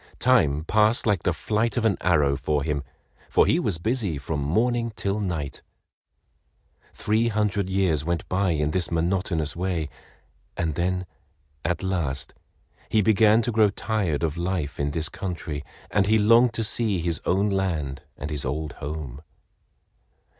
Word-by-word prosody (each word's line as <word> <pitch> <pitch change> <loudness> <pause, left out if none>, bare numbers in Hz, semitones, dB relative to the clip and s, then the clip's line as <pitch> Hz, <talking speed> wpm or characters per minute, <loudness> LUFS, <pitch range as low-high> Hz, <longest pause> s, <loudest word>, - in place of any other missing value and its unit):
Time 80 - +3
passed 110 +6 +3
like 105 -5 +2
the - - +1
flight 110 +3 -1
of 115 - +1
an 105 -4 +3
arrow 75 -6 +3
for 75 +1 -1
him, 75 -2 -1 0.5
for - - +4
he - - +3
was - - -1
busy 105 - -1
from 70 +2 -3
morning 115 - +1
till 100 +1 -1
night. 85 -8 -3 1.3
Three 110 +2 +1
hundred 105 -3 0
years 95 -6 +1
went 85 +1 -2
by 95 +1 +1
in 75 -2 +1
this 90 0 0
monotonous 85 -2 0
way, 85 -4 -2 0.7
and 80 -3 0
then 90 +3 -1 0.6
at 90 +3 -1
last 85 -8 -2 0.6
he 110 -1 +3
began 110 +2 +5
to 120 - -1
grow 110 -2 +4
tired 100 -7 -1
of 80 0 -1
life 85 -4 -2
in 70 0 0
this 75 +1 -2
country, 80 -6 -5 0.3
and 100 0 +2
he 110 +1 +4
longed 115 +3 +5
to 115 - 0
see 110 -2 0
his 85 -1 -1
own 100 +3 +2
land 80 -8 -1 0.2
and 70 - -5
his 75 -2 -2
old 75 +3 -3
home. 75 -2 -5
90 Hz, 155 wpm, -25 LUFS, 75-105 Hz, 1.3 s, began